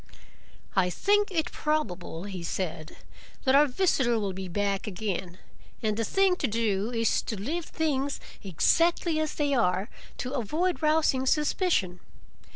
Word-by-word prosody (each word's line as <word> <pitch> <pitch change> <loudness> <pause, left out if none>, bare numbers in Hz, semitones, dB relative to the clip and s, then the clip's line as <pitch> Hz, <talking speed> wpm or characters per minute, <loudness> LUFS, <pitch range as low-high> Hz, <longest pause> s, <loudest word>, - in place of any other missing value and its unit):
"I 185 -2 +3
think 410 - +2
it 325 -5 -1
probable," 190 - -2
he 195 -3 -6
said, 165 -2 -4 0.5
"that 260 - +3
our 290 +2 +6
visitor 255 -6 +2
will 200 -3 -2
be 190 0 -5
back 200 +2 -1
again, 190 -3 -4 0.5
and 215 -1 +1
the 225 - -1
thing 385 - +3
to 280 - 0
do 215 -2 0
is 230 -1 +1
to 215 - -5
leave 315 - -3
things 285 -3 -1 0.2
exactly 330 - +2
as 310 -1 -2
they 290 -2 0
are, 205 -3 +1 0.3
to 255 +1 -4
avoid 310 - -1
rousing 305 -4 +2
suspicion. 300 - +1
240 Hz, 145 wpm, -28 LUFS, 195-310 Hz, 0.5 s, our